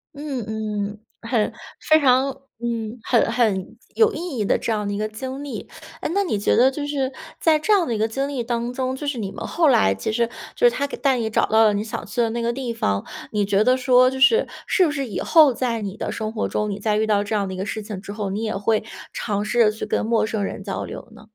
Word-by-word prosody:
嗯 280 -5 -4
嗯， 210 -1 -3 0.2
很 230 -2 0 0.3
非 310 0 +6
常 265 0 +4 0.3
嗯， 230 -1 -3
很 230 -2 +2
很 215 -6 0 0.2
有 445 0 +5
意 330 -6 -5
义 210 - 0
的 - - +2
这 230 - -3
样 210 -1 -2
的 - - -2
一 - - -2
个 215 0 -1
经 260 +6 -6
历。 285 - -6 0.3
诶， - - -2
那 400 0 +2
你 215 - -1
觉 - - +2
得 260 +2 +5
就 290 +1 -4
是， 275 -2 -1 0.3
在 315 -2 +4
这 425 +8 -1
样 370 -4 +4
的 235 - -2
一 - - -1
个 220 - +2
经 270 +5 -2
历 265 -4 -3
当 235 +1 -2
中， 260 0 -2
就 290 - -6
是 275 -5 -2
你 195 -2 -3
们 - - -6
后 330 -2 +2
来 95 - +4
其 95 - -3
实 235 +1 +1 0.3
就 485 - +2
是 - - +4
他 280 0 -1
带 275 -2 0
你 225 -2 -1
找 - - +2
到 220 +1 +4
了 210 - +4
你 205 +1 -1
想 220 - -5
去 225 +4 -5
的 230 - +2
那 235 0 -2
个 235 +1 +1
地 245 -2 -4
方， 100 - -1 0.3
你 210 -2 +1
觉 200 +1 +3
得 255 +2 +4
说 255 -1 +5
就 265 0 -5
是 450 - +5 0.2
是 375 - +3
不 300 - 0
是 275 -2 -2
以 200 - -4
后 310 -5 +5
在 235 -2 -1
你 195 -1 -4
的 - - -3
生 220 -1 -3
活 220 - -1
中， 210 - -1
你 200 - -4
再 210 0 +1
遇 220 - +2
到 205 -1 +2
这 215 +1 -2
样 200 -2 0
的 190 - -5
一 185 - -6
个 190 - -2
事 215 0 -4
情 205 -3 -6
之 200 - -8
后， 205 -2 -3
你 210 +3 -3
也 220 -2 -2
会 215 +2 +1 0.3
尝 205 -2 -2
试 240 +3 0
着 220 -2 +6
去 220 - -5
跟 - - 0
陌 225 -1 +2
生 215 -2 -2
人 - - -4
交 - - -3
流 - - -8
呢？ 215 -1 -15
230 Hz, 290 characters per minute, -22 LUFS, 210-265 Hz, 0.3 s, 非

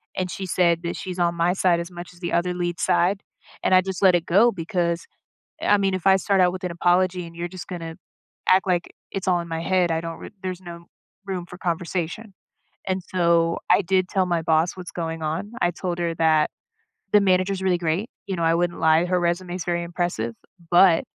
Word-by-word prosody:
and 185 -1 -2
she 195 - -5
said 170 -2 +2
that 170 0 -3
she's 185 -1 -6
on 170 0 +2
my 170 +1 +2
side 180 -2 +2
as 170 +1 -6
much 175 0 -9
as 175 - -19
the 175 -1 -4
other 180 +1 +1
lead's 175 -1 -3
side. 190 +3 +2 0.4
And - - +2
I 185 - +7
just 190 0 -5
let 190 -2 +6
it 175 -1 0
go 210 +7 +5
because 170 -1 -2 0.6
I 205 - +4
mean, 195 -1 +1
if 185 -1 -4
I 190 0 +7
start 195 0 +1
out 180 -1 +4
with 185 0 -7
an 180 - -2
apology 180 +1 +1
and 165 0 -13
you're 170 +1 -3
just 185 +1 -9
gonna 165 -3 -6 0.5
act 190 +1 +5
like 180 -2 0 0.2
it's 190 -1 -3
all 180 -1 +3
in 170 - -7
my 165 0 -3
head, 180 -1 +2
I 160 - 0
don't 165 0 -6
re - - -9
there's 185 -1 -4
no 170 -1 -10 0.4
room 185 -3 -3
for 180 - -11
conversation. 175 +4 -3 0.5
And 190 0 -1
so 170 -2 +2
I 180 - +6
did 185 0 +1
tell 190 -1 +1
my 170 -2 0
boss 160 +2 +2
what's 180 -1 -8
going 165 -1 -4
on. 165 +8 -3
I 175 - +3
told 175 0 -4
her 170 -1 -1
that 160 -2 +3 0.6
the 210 - +8
manager's 190 0 +2
really 185 -2 +2
great. 170 +6 -1 0.2
You 195 - -2
know, 170 - -1
I 165 0 +3
wouldn't 175 0 -1
lie. 160 +2 +4
Her 180 0 +1
resume 175 +1 -1
is 180 -2 -5
very 175 -1 0
impressive, 170 -10 -3 0.4
but 175 -1 +6
175 Hz, 225 wpm, -23 LUFS, 170-185 Hz, 0.6 s, the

